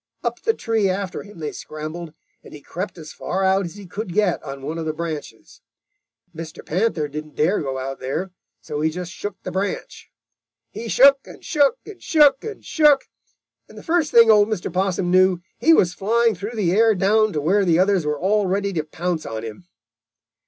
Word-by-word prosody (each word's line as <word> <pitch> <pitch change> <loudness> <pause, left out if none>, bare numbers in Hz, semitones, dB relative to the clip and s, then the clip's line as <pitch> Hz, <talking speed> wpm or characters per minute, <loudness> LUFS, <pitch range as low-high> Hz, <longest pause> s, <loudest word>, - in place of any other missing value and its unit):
Up - - -3
the 450 -1 +1
tree 220 -4 0
after 190 0 -3
him 205 -2 -14
they 155 -2 -4
scrambled, 155 +1 -7 0.3
and - - -12
he 145 - -12
crept 185 +6 -6
as 155 -2 -10
far 190 +2 -3
out 190 0 +2
as 170 - -8
he 205 -1 -10
could 185 0 -6
get 205 -4 +2
on 135 0 -8
one 155 +4 -4
of 160 - -4
the 155 - -1
branches. 155 -2 -7 0.7
Mr. 160 0 -8
Panther 180 -3 0
didn't 150 +1 -8
dare 180 +7 +1
go 135 -3 -3
out 135 +1 -5
there, 155 +9 -3 0.3
so 150 +5 -5
he 160 - +2
just 175 +2 -6
shook 205 +2 -6
the - - -5
branch. 195 +1 -4 0.6
He 225 +3 -7
shook 275 +4 +6
and - - -13
shook 300 - +2
and 415 -3 -11
shook 290 -4 +4
and 445 -1 -8
shook, 295 -4 +3 0.6
and - - -15
the - - -10
first 325 -2 +1
thing 230 -1 +7
old 210 -1 +5
Mr. 200 -5 -3
Possum 185 -1 0
knew, 185 0 +4 0.2
he 325 - +4
was 180 - +4
flying 230 +4 +2
through 205 +5 -6
the 195 -6 +1
air 220 +3 +4
down 215 +3 +3
to 150 - -1
where 190 +7 +2
the 170 -3 +3
others 190 -1 +3
were 150 -1 -2
all 200 +3 +1
ready 200 +1 -1
to 160 -3 -1
pounce 165 +1 -3
on 110 0 -5
him. 115 +11 -9
185 Hz, 200 wpm, -22 LUFS, 160-215 Hz, 0.7 s, thing